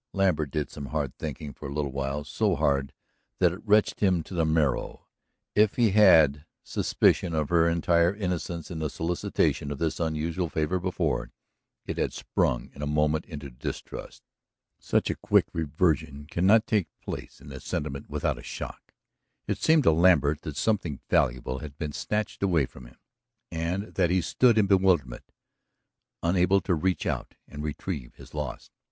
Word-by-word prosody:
Lambert 90 -7 +1
did 75 +2 -3
some 70 -1 -7
hard 75 -4 -2
thinking 75 -1 -5
for - - -8
a - - -7
little 75 -2 -1
while, 70 +2 -3
so 75 - 0
hard 70 -1 +1 0.5
that 90 -2 +4
it 95 - -9
wrenched 105 0 +3
him 90 -5 +2
to - - -11
the 85 -2 +1
marrow. 80 -4 0 0.5
If 105 -1 +3
he 115 -4 +3
had 80 -9 +6
had 75 - -19 0.2
suspicion 85 -3 +1
of 75 -2 0
her 85 -1 +4
entire 85 +2 +2
innocence 90 -4 -3
in 80 - -4
the 80 -1 -1
solicitation 80 -3 -1
of 70 - -4
this 80 +2 -1
unusual 80 +2 -1
favor 80 +4 0
before, 90 0 -1 0.6
it - - -4
had - - 0
sprung - - -1
in 70 - -10
a 75 - -2
moment 75 +1 +1
into 75 -5 -8
distrust. - - -7 0.6
Such - - +1
a - - -3
quick - - +3
reversion 75 -2 0
cannot 95 +8 +3
take 105 -5 +1
place - - -7
in 70 +2 -13
the 70 -1 -8
sentiment 70 +1 -4
without - - -1
a - - -11
shock. - - -8 0.5
It - - -2
seemed 160 -2 +4
to - - +6
Lambert 80 -3 +4
that 75 -2 -6
something 90 -10 0
valuable 65 +1 +1
had 75 -1 -9
been 75 -2 -3
snatched 105 +6 -3
away 85 -7 +2
from 60 -1 -13
him, - - -19 0.5
and 85 +6 -3
that 90 -3 +2
he 90 +1 +2
stood 115 +7 +3
in 105 - +5
bewilderment, 95 -11 +2 0.9
unable 90 +3 +3
to 90 - 0
reach 90 +3 0
out - - -3
and 75 - -8
retrieve 75 -2 -5
his - - -14
loss. - - -5
80 Hz, 170 wpm, -27 LUFS, 75-90 Hz, 0.9 s, had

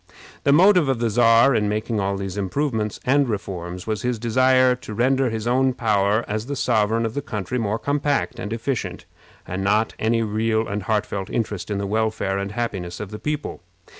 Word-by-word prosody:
The 140 - +5
motive 180 -1 +5
of 135 - +1
the 115 -1 0
Czar 115 +3 +5
in 105 -3 +1
making 110 +1 -1
all 100 0 -1
these 95 -1 -5
improvements 110 +2 -2
and 140 0 +3
reforms 90 -4 -5
was 110 -2 -2
his 125 -1 -1
desire 130 +3 +3
to 110 -4 -8
render 130 +2 +2
his 110 -1 -4
own 130 +1 +2
power 105 -1 +1
as 110 +3 -3
the 140 - -3
sovereign 115 -2 +1
of 110 - -3
the 145 - -2
country 110 -1 -4
more 110 -1 -1
compact 140 -1 -1
and 105 -2 -5
efficient, 115 +2 -3 0.4
and 95 +2 -3
not 105 +3 +2
any 115 +1 +1
real 110 +1 0
and 100 +1 -3
heartfelt 105 -1 -2
interest 105 -5 -3
in 100 - -1
the 100 - -2
welfare 110 -2 -1
and 100 +1 -4
happiness 95 -7 -4
of 105 -1 -6
the 105 - -7
people. 150 0 -4
110 Hz, 195 wpm, -22 LUFS, 105-125 Hz, 0.4 s, The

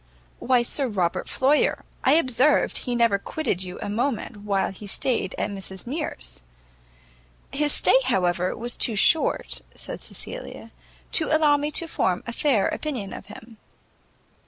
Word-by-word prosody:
"Why, 250 -1 +2
Sir 270 +3 0
Robert 185 -7 -1
Floyer; 280 +3 +2 0.2
I 265 - +5
observed 285 -1 +3
he 245 -2 -3
never 230 -4 +3
quitted 200 - -2
you 180 -1 -6
a - - -4
moment 230 +1 -2
while 200 -2 -1
he 200 +2 -10
stayed 200 -2 +1
at 210 - -2
Mrs 190 -1 -7
Mears." 235 - -5 1.1
"His 295 +1 +1
stay, 260 - +5
however, 180 -6 +1
was 240 +1 -2
too 230 - +2
short," 310 +10 +2
said - - -7
Cecilia, - - -6 0.4
"to 315 - +4
allow 310 -2 +4
me 290 +1 -1
to 335 - +1
form 185 - 0
a 235 - -5
fair 235 -7 +2
opinion 250 -11 -4
of - - -9
him." 225 +2 -12
235 Hz, 150 wpm, -24 LUFS, 195-285 Hz, 1.1 s, I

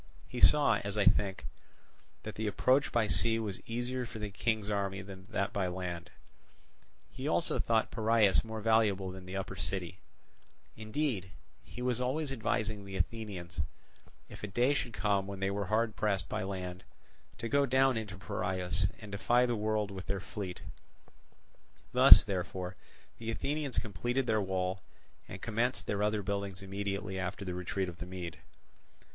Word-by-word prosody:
He 125 - -5
saw, 145 -7 +6
as 100 +1 -3
I 105 - +3
think, 95 +1 +2 0.8
that 110 - -5
the 110 0 -3
approach 130 +6 +3
by 120 -2 +3
sea 115 +2 +4
was 105 -4 -3
easier 120 +2 -2
for 110 0 -8
the 105 -1 -4
king's 110 +1 0
army 100 -2 -1
than 95 -1 -10
that 100 -4 -1
by 95 -2 0
land: 90 -1 -4 1.0
he - - -5
also - - +1
thought 115 -1 +2
Piraeus 110 -3 +4
more 110 -1 -5
valuable 105 -4 +3
than 95 0 -10
the 95 +1 -4
upper 95 0 -4
city; 90 -1 -4 0.8
indeed, 110 - -2 0.3
he 125 - -8
was 125 -1 0
always 135 +3 -1
advising 110 -4 -1
the 100 0 -8
Athenians, 90 -5 -3 0.7
if - - -11
a 105 - -3
day 120 +7 +2
should 120 -4 -2
come 100 -3 +1
when 100 -1 -6
they 95 0 0
were 100 -1 -2
hard 110 +2 +1
pressed 100 -3 0
by - - -2
land, 95 -1 -4 0.5
to 115 - -3
go 140 +3 +3
down 130 0 +4
into 105 -2 -4
Piraeus, 95 0 0
and 105 -2 -10
defy 120 +5 +3
the 120 -1 0
world 105 -1 0
with 95 -3 -7
their 100 0 -1
fleet. 95 -1 -6 1.3
Thus, - - +10
therefore, 95 -1 -3 0.4
the 115 0 -5
Athenians 140 +4 -2
completed 120 +5 -1
their 110 -2 +2
wall, 95 -1 -1 0.5
and - - -9
commenced 115 +3 0
their 100 -1 -1
other 105 0 +1
buildings 100 -1 -3
immediately 100 0 -3
after 100 +2 -3
the 90 - -3
retreat 90 +2 -2
of 85 -1 -8
the 90 - -6
Mede. 90 -2 -6
100 Hz, 165 wpm, -32 LUFS, 95-115 Hz, 1.3 s, Thus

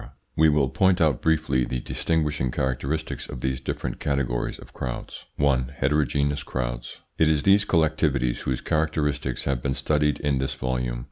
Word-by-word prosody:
We 80 0 +5
will 75 -3 +2
point 95 +4 +3
out 75 -6 +2
briefly 80 -5 +2
the 65 +1 -2
distinguishing 75 -1 -1
characteristics 65 +5 -2
of 60 - -7
these 65 0 -1
different - - -4
categories 65 -4 -1
of - - -14
crowds. 60 -2 -6
1. 70 -2 +1
HETEROGENEOUS 70 0 +1
CROWDS - - -4 0.2
It 80 - +5
is 75 -2 +2
these 100 +1 +5
collectivities 75 -6 +2
whose 65 -1 -2
characteristics 75 -2 0
have 65 -3 -1
been 65 0 -1
studied 75 -1 +1
in 70 -2 0
this 65 0 -2
volume. 60 -2 -2
70 Hz, 155 wpm, -25 LUFS, 65-75 Hz, 0.2 s, We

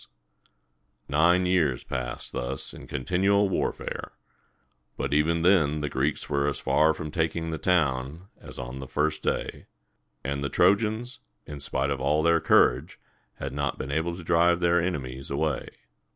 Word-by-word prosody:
Nine 85 +5 +3
years 85 -8 +1
passed 60 -1 -5
thus - - -1
in - - -11
continual 95 +8 +1
warfare, - - -3 0.8
but - - -2
even 80 +3 +2
then 75 -5 +3
the 75 - -2
Greeks 70 +3 -1
were 70 -1 0
as 70 -2 -1
far 80 +1 +3
from 75 -1 -5
taking 80 0 -1
the 80 - -4
town 75 -1 0
as - - -9
on 65 +2 -6
the 65 - -7
first 75 +2 -1
day; - - -3 0.6
and 70 +2 -3
the 70 - -1
Trojans, 110 - +1 0.3
in 75 -1 -8
spite 70 0 -1
of 70 - -2
all 75 +3 +2
their 85 0 +4
courage, 65 +7 +3 0.4
had - - -6
not 70 0 -2
been 70 - -5
able 80 +3 -1
to 90 - -9
drive 85 +1 +3
their 85 -1 +3
enemies 70 -7 -4
away. 70 -1 -1
75 Hz, 155 wpm, -26 LUFS, 70-85 Hz, 0.8 s, their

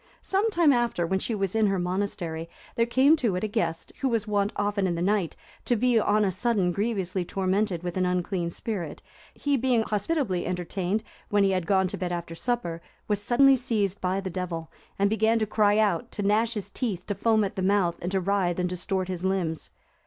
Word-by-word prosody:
Some 395 +4 +1
time 340 -8 +4
after, 240 -8 +1
when 190 +3 0
she 225 - -2
was 195 -2 -1
in 220 -1 +4
her 195 -1 +1
monastery, 180 -3 -3 0.3
there 230 0 +2
came 265 +6 +5
to 230 -10 0
it 180 - -2
a - - +1
guest, 165 -5 -2
who 270 - +2
was 225 -3 0
wont 205 0 +1
often 205 -1 0
in 175 - -1
the 170 - -3
night 195 -3 +1 0.3
to 240 - +2
be 240 0 +3
on 210 0 +2
a 190 - +1
sudden 200 -2 +1
grievously 195 -2 -1
tormented 190 0 -1
with 175 -1 -4
an 185 - +2
unclean 180 -1 -1
spirit; 175 -4 -5 0.3
he 285 -1 0
being 245 -2 +2
hospitably 210 - -1
entertained, 185 +3 -2 0.3
when 205 -1 +3
he 195 - +3
had 185 -3 -1
gone 190 -2 +3
to - - -4
bed 180 -1 -2
after 170 -1 -4
supper, 170 -4 -2 0.3
was 205 -1 0
suddenly 270 +5 +5
seized 215 -6 -1
by 185 +1 0
the 190 -1 -4
Devil, 170 -2 -4 0.3
and 200 - +3
began 220 +2 +2
to 220 - +1
cry 210 0 +3
out, 220 +2 +1
to 205 - -3
gnash 220 +3 +2
his 205 -1 -4
teeth, 200 -8 -3
to 205 - -2
foam 220 +2 +2
at 200 0 -3
the 190 - -2
mouth, 185 -3 +2
and 180 - -3
to 195 - +1
writhe 185 -2 0
and 180 -1 0
distort 185 +1 -2
his 180 -1 -4
limbs. 185 -5 -1
200 Hz, 215 wpm, -26 LUFS, 180-220 Hz, 0.3 s, came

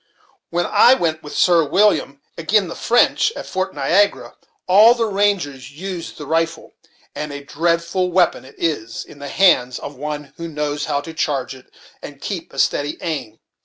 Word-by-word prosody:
When 175 +1 0
I 255 - +6
went 160 -7 -1
with 150 - -8
Sir 175 -2 +4
William 150 -4 +1
agin' 185 +3 +1
the - - -6
French, 245 - +2
at - - -6
Fort 185 -3 -3
Niagara, 180 +9 +1 0.3
all 210 +6 +7
the 235 -2 0
rangers 195 -11 -1
used 180 +2 -6
the 150 - -7
rifle; 165 +2 -2 0.4
and 150 -1 -5
a 145 0 -7
dreadful 170 +4 0
weapon 175 -1 +2
it 130 - -15
is, 115 -9 -3
in 145 - -15
the 140 0 -7
hands 130 -9 +3
of 145 - -8
one 150 0 -6
who 170 - -5
knows 150 -2 -3
how 145 -2 -1
to 160 +3 -9
charge 140 -5 -2
it, 130 -1 -15 0.3
and - - -10
keep - - -5
a - - -13
steady 145 +1 0
aim. 145 -10 -4
160 Hz, 175 wpm, -20 LUFS, 145-185 Hz, 0.4 s, all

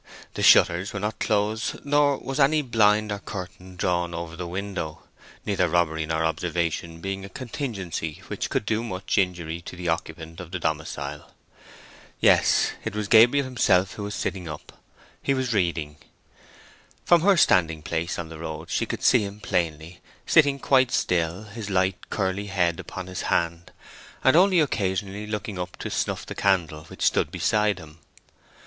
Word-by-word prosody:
The - - -4
shutters 90 +4 +5
were 100 - -3
not 105 +2 -3
closed, 110 +1 -1
nor 145 -1 +3
was 135 +2 -5
any 150 +2 +4
blind 110 -3 +3
or 100 - -3
curtain 90 -2 -8
drawn 90 -1 -1
over 85 0 -6
the 90 0 -5
window, 90 -4 -5 0.4
neither 95 -3 +1
robbery 80 -2 +1
nor 80 0 0
observation 85 0 -2
being 95 +1 -4
a 100 - -8
contingency 100 - -5
which - - -4
could - - -1
do 110 +1 0
much 100 -2 -1
injury 85 -3 -1
to 90 - -9
the 90 -1 -3
occupant 80 0 -4
of 90 -2 -8
the 90 - -3
domicile. 75 -3 -4 0.8
Yes, - - +4
it - - -4
was 105 -1 -2
Gabriel 120 +6 +6
himself 100 -7 +2
who - - -8
was 100 0 -4
sitting 90 -3 -3
up: 75 -1 -8 0.5
he 140 - +1
was 130 -2 -1
reading. 85 -6 -1 1.1
From 175 -1 +5
her 195 +1 +4
standing 80 - +3
place 85 +2 -2
in 85 -1 -5
the 80 -1 -9
road 80 0 -6
she - - 0
could - - -5
see - - +5
him 100 +1 -7
plainly, 85 -3 -2 0.2
sitting 145 -3 +4
quite 130 -2 +3
still, 85 +2 0
his 105 0 -7
light 95 -1 0
curly 100 0 -1
head 90 -4 0
upon 95 - -7
his 95 0 -5
hand, 85 0 -1 0.5
and 130 - +5
only 185 +1 +5
occasionally 100 -5 -2
looking 105 -2 -4
up 90 0 -5
to - - -5
snuff - - -2
the - - -6
candle 85 -6 0
which - - -8
stood - - +2
beside 105 -1 +1
him. 80 -2 -13
95 Hz, 165 wpm, -25 LUFS, 85-105 Hz, 1.1 s, Gabriel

